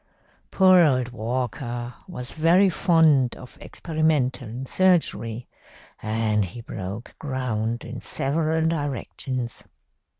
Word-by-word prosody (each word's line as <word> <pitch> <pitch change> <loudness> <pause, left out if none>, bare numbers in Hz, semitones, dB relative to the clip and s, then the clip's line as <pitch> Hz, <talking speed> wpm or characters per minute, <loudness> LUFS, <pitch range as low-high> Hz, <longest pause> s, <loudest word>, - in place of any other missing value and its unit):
"Poor 185 -1 +6
old 130 -7 +3
Walker 120 +1 -3
was 125 -9 -7
very 175 +5 +4
fond 160 -8 +3
of 125 - -12
experimental 135 -6 -1
surgery, 135 -10 +1 0.5
and 110 -1 0
he 95 +6 -7
broke 100 +1 -7
ground 120 -5 -2
in 120 +1 -7
several 160 +3 -1
directions. 135 -5 -3
130 Hz, 95 wpm, -24 LUFS, 120-160 Hz, 0.5 s, Poor